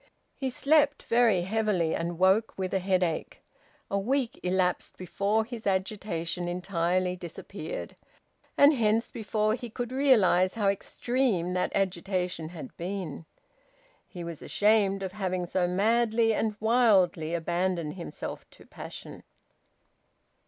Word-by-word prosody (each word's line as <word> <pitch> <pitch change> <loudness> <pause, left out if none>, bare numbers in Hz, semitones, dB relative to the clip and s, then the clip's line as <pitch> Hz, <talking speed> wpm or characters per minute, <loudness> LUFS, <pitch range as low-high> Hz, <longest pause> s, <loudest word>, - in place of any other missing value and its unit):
He 265 -2 -2
slept 290 +3 +2
very 230 -6 +3
heavily, 190 -4 0
and 170 0 -3
woke 190 +5 +3
with 185 -1 -3
a 190 - +2
headache. 185 -3 -1 0.5
A 200 - +1
week 255 +3 -1
elapsed 180 0 0
before 200 +4 0
his 230 -2 -6
agitation 190 -3 -2
entirely 180 0 0
disappeared, 180 - -7 0.6
and 285 +2 +7
hence 225 -3 +1
before 215 0 0
he 240 0 -5
could 240 +2 -5
realise 215 -9 +4
how 205 -3 +2
extreme 200 -2 -1
that 180 - 0
agitation 180 -3 -1
had 180 +8 -9
been. 175 -4 -5 0.8
He 175 - -8
was 170 -2 -7
ashamed 205 -2 +2
of 190 - -3
having 185 -3 -2
so 180 0 0
madly 225 +4 +2
and 215 0 -1
wildly 195 -8 +3
abandoned 170 -1 -1
himself 170 -5 -7
to - - -18
passion. - - -9
195 Hz, 125 wpm, -28 LUFS, 180-225 Hz, 0.8 s, and